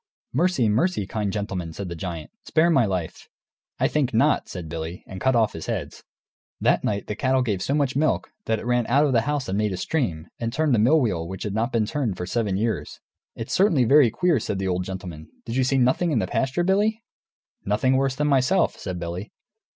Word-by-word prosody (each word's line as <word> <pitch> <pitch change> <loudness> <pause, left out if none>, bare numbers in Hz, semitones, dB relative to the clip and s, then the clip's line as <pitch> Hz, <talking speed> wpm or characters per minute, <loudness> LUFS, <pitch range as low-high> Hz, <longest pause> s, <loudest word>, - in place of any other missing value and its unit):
"Mercy, 155 -4 +2
mercy, 110 - +1
kind 105 0 -2
gentleman!" 95 -5 -3
cried 95 +4 -6
the 85 - -5
giant. 80 -4 -6
"Spare 170 +2 +3
my 135 -7 +4
life!" 90 -4 -4 0.5
"I - - +3
think 135 -5 0
not," 115 - +2
said 85 -3 -6
Billy, 80 +2 -6
and 95 - -9
cut 130 -1 +2
off 110 -2 +2
his 80 - -7
heads. - - -4 0.6
That - - +2
night 100 -1 -1
the 105 - -4
cattle 130 +2 +1
gave 105 -6 -1
so 140 - 0
much 140 -3 0
milk 155 +2 0
that 110 - +1
it 110 - -8
ran 120 -1 +1
out 140 +5 +4
of 140 - +1
the 115 - +4
house 145 -3 -1
and 95 +2 -1
made 105 -2 0
a - - -3
stream, 90 - -2
and 115 -1 -2
turned 150 0 +2
a - - +2
mill 135 +9 +5
wheel 90 - -1
which 95 +2 -6
had 105 - -3
not 115 +4 0
been 115 -3 +1
turned 115 - -2
for 90 - -4
seven 100 -1 -1
years! 110 +2 -2 0.4
"It's 115 - -5
certainly 180 -9 +4
very 135 +1 +6
queer," 170 - +1
said 105 - -3
the 95 0 -2
old 90 0 -1
gentleman; 90 -5 -7 0.2
"did 115 - -4
you 130 - +2
see 135 +1 +1
nothing 130 +7 +2
in 145 - +1
the 100 - +1
pasture, 135 - 0
Billy?" 210 +5 +1 0.6
"Nothing 115 +6 +1
worse 135 0 +1
than 150 - 0
myself," 140 +6 +2
said 90 -1 -5
Billy. 85 +4 -5
115 Hz, 225 wpm, -24 LUFS, 95-135 Hz, 0.6 s, very